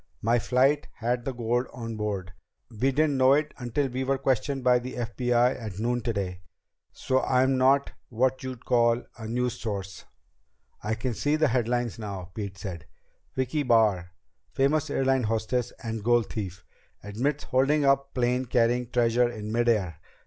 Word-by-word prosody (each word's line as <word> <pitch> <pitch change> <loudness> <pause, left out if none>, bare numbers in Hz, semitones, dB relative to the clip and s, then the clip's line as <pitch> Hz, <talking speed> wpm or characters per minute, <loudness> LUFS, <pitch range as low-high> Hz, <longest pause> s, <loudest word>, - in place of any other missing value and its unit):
"My 115 +2 +3
flight 135 +5 +2
had 120 +1 -2
the 135 - -1
gold 120 +1 -1
on 115 -2 -6
board. 100 -4 -3 0.4
We 125 +5 +1
didn't 145 0 +2
know 130 +1 +6
it 150 +1 +1
until 125 +3 -1
we 130 +1 -3
were 135 +1 +1
questioned 135 +1 0
by 125 -1 +5
the 125 +1 -7
FBI 125 +1 +1
at 105 -4 -6
noon 120 +3 0
today. 100 -6 -3 0.5
So 130 0 0
I'm 130 +1 +2
not 135 +2 +3 0.2
what 130 +2 +1
you'd 130 -2 -7
call 120 0 +3 0.2
a 110 - -6
news 125 +1 -1
source." 100 -4 -5 0.8
"I 110 +2 -1
can 125 +1 -3
see 145 +6 0
the 155 -2 +2
headlines 120 -1 0
now," 95 -4 -6
Pete 100 -2 -5
said. 90 -5 -7 0.5
"Vicki 130 +3 0
Barr 105 -9 +2 0.4
famous 145 +3 +1
airlines 135 -4 +1
hostess 115 +2 -1
and 115 -2 -4
gold 120 0 +2
thief. 95 -6 -5 0.4
Admits 130 +9 -2
holding 140 +3 +2
up 140 0 +2
plane 125 +1 +1
carrying 120 0 +1
treasure 120 0 +2
in 110 -2 -6
mid 120 +1 +2
air. 95 -8 0
120 Hz, 165 wpm, -27 LUFS, 110-130 Hz, 0.8 s, know